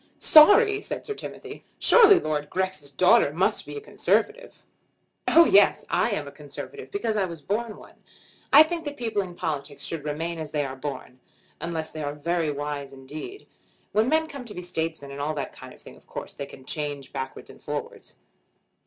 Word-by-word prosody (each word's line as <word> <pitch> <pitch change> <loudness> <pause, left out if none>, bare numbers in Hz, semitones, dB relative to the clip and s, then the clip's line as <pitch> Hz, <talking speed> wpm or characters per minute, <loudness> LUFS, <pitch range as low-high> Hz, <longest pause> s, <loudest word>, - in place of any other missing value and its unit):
"Sorry!" 410 +6 +7
said - - -5
Sir 425 - -3
Timothy. - - -9
"Surely 425 -5 +7
Lord 150 -1 -3
Grex's 185 -6 -2
daughter 140 +1 +4
must 190 +7 0
be - - -7
a - - -6
Conservative." 475 +2 -1 0.6
"Oh 335 +1 +7
yes; 385 - +4
I - - +2
am - - -3
a - - -8
Conservative 430 0 -9
because 390 - -2
I 200 -2 +1
was 170 -3 -7
born 215 +7 -3
one. - - -15 0.6
I 295 +3 +10
think 330 +1 -4
that 290 0 -5
people 225 -4 -1
in 180 -2 -8
politics 145 -4 -4
should 165 -3 -4
remain 160 +3 -3
as 155 -1 -5
they 150 -1 -1
are 135 -1 -6
born, 130 -2 -7 0.4
unless 165 -2 -4
they 155 - -6
are 145 0 -3
very 165 +1 -1
wise 145 -1 -5
indeed. 150 - -9 0.5
When 220 +4 +2
men 315 +1 +2
come 280 -5 -8
to 210 - -9
be 180 - -5
statesmen 160 -5 -3
and 140 +1 -6
all 155 +2 -2
that 140 - -4
kind - - -11
of - - -16
thing, - - -14
of - - -23
course - - -7
they 140 - -7
can 130 - -14
change 145 -2 -4
backwards 130 0 -6
and - - -18
forwards." - - -6
165 Hz, 195 wpm, -25 LUFS, -, 0.6 s, I